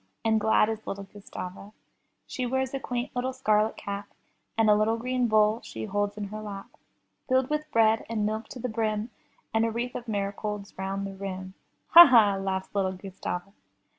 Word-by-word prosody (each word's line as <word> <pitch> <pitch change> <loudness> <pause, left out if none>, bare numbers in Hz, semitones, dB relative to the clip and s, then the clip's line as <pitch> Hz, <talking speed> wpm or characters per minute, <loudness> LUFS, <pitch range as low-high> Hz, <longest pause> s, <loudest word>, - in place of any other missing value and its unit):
And 220 -1 +3
glad 220 0 +4
is 220 0 -5
little 200 0 -4
Gustava. 195 0 -9 0.5
She 255 -1 -3
wears 265 +1 -1
a 275 - -2
quaint 245 0 -4
little 255 +1 -1
scarlet 215 -4 +1
cap, 200 0 -5 0.5
And 225 -1 +4
a 210 - +7
little 215 +2 +2
green 250 +1 0
bowl 215 0 +3
she 110 0 -7
holds 205 - -1
in 205 -1 -4
her 215 +1 -6
lap, 200 -2 -8 0.6
Filled 260 +1 +2
with 300 0 -2
bread 225 -1 +4
and 220 -2 0
milk 220 +1 -2
to 255 - -9
the 250 - -2
brim, 220 0 -2 0.4
And 225 0 +3
a 230 - +2
wreath 240 +2 -3
of 240 - -6
marigolds 205 0 -3
round 195 +1 -3
the 195 - -6
rim; 190 -1 -6 0.4
*'Ha! 345 +1 +11
ha!'' 215 -5 +5
laughs 190 -1 -3
little 190 -2 0
Gustava. 190 0 -6
215 Hz, 185 wpm, -27 LUFS, 200-235 Hz, 0.6 s, Ha